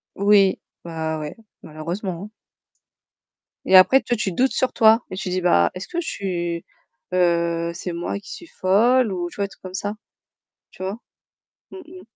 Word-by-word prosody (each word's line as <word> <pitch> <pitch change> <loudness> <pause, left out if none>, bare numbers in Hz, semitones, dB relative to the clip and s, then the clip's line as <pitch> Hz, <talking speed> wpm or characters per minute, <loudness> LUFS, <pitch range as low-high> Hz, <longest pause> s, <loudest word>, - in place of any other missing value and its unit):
Oui, 200 -1 +4 0.2
bah, 160 -2 -3
ouais, 150 -1 -6 0.3
malheureusement, 170 +4 -5
hein. 210 - -8 1.4
Et 190 - +4
après 225 +9 +7
toi 240 - -1
tu 210 -3 -2
doutes 255 +9 +1
sur 260 - 0
toi 225 +1 +5
et - - -4
tu 185 - -4
dis: 185 0 -1
«Bah, 85 - +3
est-ce 185 - -7
que 345 - -3
je 335 - -7
suis, 175 -3 -3 0.5
heu 170 -1 +1
c'est 175 +1 -5
moi 175 +3 -3
qui 200 - -12
suis 340 - -9
folle?» 225 +3 +3
ou 175 -1 -3
tu - - -15
vois 200 - 0
des - - -8
trucs - - -18
comme 185 -1 -8
ça, 205 +2 -3 0.8
tu - - -12
vois? 195 +4 -3 0.7
Mmh - - -9
mh. 365 +2 -12
185 Hz, 185 wpm, -22 LUFS, 170-210 Hz, 1.4 s, après